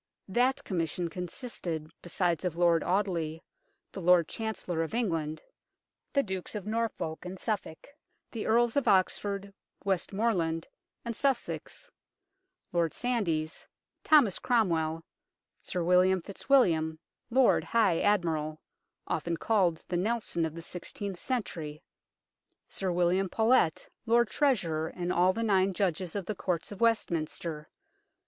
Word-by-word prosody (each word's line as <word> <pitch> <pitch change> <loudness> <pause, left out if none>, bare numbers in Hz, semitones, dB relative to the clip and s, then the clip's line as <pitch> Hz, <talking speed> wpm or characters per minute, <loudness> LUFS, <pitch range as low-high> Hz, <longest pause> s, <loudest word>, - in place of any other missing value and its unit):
That 250 +6 +2
Commission 170 -1 -2
consisted 175 - -5
besides 175 -1 0
of 180 -3 -1
Lord 170 -1 +4
Audeley, 175 -5 -1 0.5
the 195 - -7
Lord 175 -1 +5
Chancellor 220 -7 -3
of 165 +7 -3
England; 165 -9 -1 0.7
the 280 -1 +2
Dukes 190 -1 -5
of 205 -2 -4
Norfolk 215 -7 -2
and 180 +1 -6
Suffolk; 200 -6 -4 0.5
the 225 - -4
Earls 235 +1 +3
of 280 - +1
Oxford, 200 +1 +1 0.3
Westmorland 190 -3 0 0.4
and 235 -1 -3
Sussex; 280 - -2 0.8
Lord 170 -2 +1
Sandys; 170 -11 -1 0.4
Thomas 280 - +5
Cromwell; 165 -9 +1 0.6
Sir 180 - -3
William 180 +1 +4
Fitzwilliam, 170 -9 +2 0.3
Lord 255 +1 +4
High 215 -8 +2
Admiral 160 -6 +1 0.5
often 170 -1 -2
called 180 -5 +1
"the 175 - -1
Nelson 205 -4 0
of 160 - -9
the 165 - -7
sixteenth 180 +2 -5
century 165 - -4 0.4
"; - - -43
Sir 190 -2 -2
William 180 +2 +2
Paulet, 220 -6 +2 0.2
Lord 235 0 +3
Treasurer, 175 - +1
and 175 +1 -3
all 180 +2 +4
the 230 +4 -3
nine 195 -3 +3
Judges 185 -2 -1
of 200 -3 -2
the 215 - -2
Courts 180 -3 -2
of 205 - -8
Westminster. 165 -8 0
185 Hz, 125 wpm, -30 LUFS, 165-220 Hz, 0.8 s, Lord